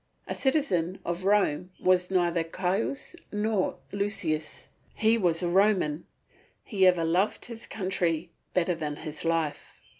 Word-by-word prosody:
A - - -3
citizen 200 - +1
of 175 +2 -3
Rome 195 -4 +2
was 180 -1 +3
neither 175 -3 +2
Caius 185 - -2 0.2
nor 210 -2 0
Lucius, 200 -6 -1 0.3
he 220 +1 +3
was 180 -5 +1
a - - +1
Roman; 180 -4 +2 0.6
he 195 -4 +3
ever 180 -2 +4
loved 180 +5 +1
his 230 -2 -9
country 175 -4 -1 0.2
better 180 0 +1
than 155 -3 -4
his 155 0 -7
life. 165 -3 -2
180 Hz, 130 wpm, -28 LUFS, 165-200 Hz, 0.6 s, ever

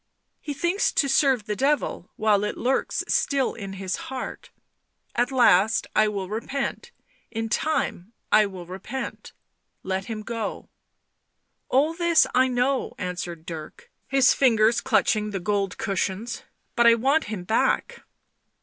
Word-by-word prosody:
He 290 -2 -6
thinks 345 +7 +1
to 280 - +2
serve 270 -4 +3
the 210 - -2
Devil 275 - 0
while 210 -2 +2
it 210 - -3
lurks 260 +2 0
still 275 -2 +1
in 195 -3 -7
his 190 -1 -3
heart: 260 -1 -6 0.3
' - - -52 0.3
At 245 +1 +1
last 220 -4 +4
I 215 0 +5
will 200 -3 -3
repent 270 - -4 0.2
— - - -38
in 225 0 -2
time 230 - -1 0.2
I 215 -1 +5
will 185 -3 -9
repent 195 +9 -6 0.2
!' - - -51
— - - -50
let 190 +1 -2
him 215 -1 -5
go. 225 -2 -5 0.5
" - - -51
All 290 +5 +3
this 340 -1 +4
I 255 +1 +4
know," 255 +2 0
answered 175 -3 -5
Dirk, 160 -4 -9 0.2
his 270 -1 +4
fingers 230 -2 +3
clutching 215 -3 +1
the 200 -2 -3
gold 195 0 -1
cushions. 200 +2 -2 0.2
" - - -47
But 235 0 +5
I 230 - +7
want 275 +7 +2
him 205 -4 -5
back." 220 +5 0
225 Hz, 160 wpm, -25 LUFS, 195-265 Hz, 0.5 s, I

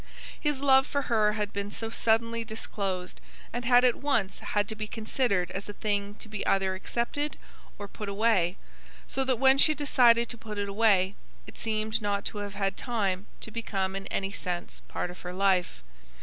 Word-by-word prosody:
His 295 -3 -1
love 270 -1 +5
for 280 -1 -1
her 210 -1 +4
had 210 -1 -2
been 200 0 -3
so 225 +2 -4
suddenly 230 +1 +1
disclosed, 200 -4 -4 0.3
and 240 +1 -3
had 245 0 +6
at 245 - +5
once 230 -9 0
had 205 -1 -1
to 220 - -2
be 215 0 -4
considered 215 -5 0
as 195 +2 -5
a - - -5
thing 205 -1 -1
to 220 - -10
be 210 -1 -4
either 190 -1 +2
accepted 240 +9 -2 0.4
or 205 - -6
put 210 0 -6
away; 200 -4 +2 0.5
so 270 - 0
that 260 -2 +1
when 265 +2 +5
she 310 +1 +5
decided 240 -5 +4
to 235 - -4
put 215 -2 -7
it 200 0 -1
away, 200 -2 +3 0.3
it - - -11
seemed 220 0 0
not 200 -1 -1
to 210 - -4
have 205 -1 -5
had 195 -1 0
time 205 -6 -1
to 220 - -5
become 195 -4 -2
in 195 0 -5
any 195 0 -2
sense 180 -3 -5
part 175 - -3
of 180 - -12
her 180 0 -6
life. 185 - +1
210 Hz, 190 wpm, -28 LUFS, 195-235 Hz, 0.5 s, had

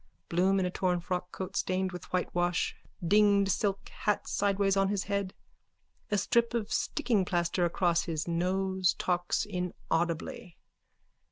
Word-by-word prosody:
Bloom 190 +3 +3
in 185 - +1
a 180 - -1
torn 180 -1 0
frockcoat 180 +2 -4
stained 185 0 0
with 180 -2 -7
whitewash, 175 -1 0 0.3
dinged 200 0 +4
silk 195 0 -1
hat 205 -1 -1
sideways 200 -1 +1
on 195 0 +3
his 200 -1 0
head, 200 -2 -2 0.7
a 205 - +1
strip 235 +4 +2
of 220 -3 -1
stickingplaster 185 - +1
across 170 0 +1
his 160 -1 -3
nose, 185 +2 +1
talks 175 -1 0
inaudibly.) 175 -3 -3
185 Hz, 125 wpm, -30 LUFS, 175-200 Hz, 0.7 s, dinged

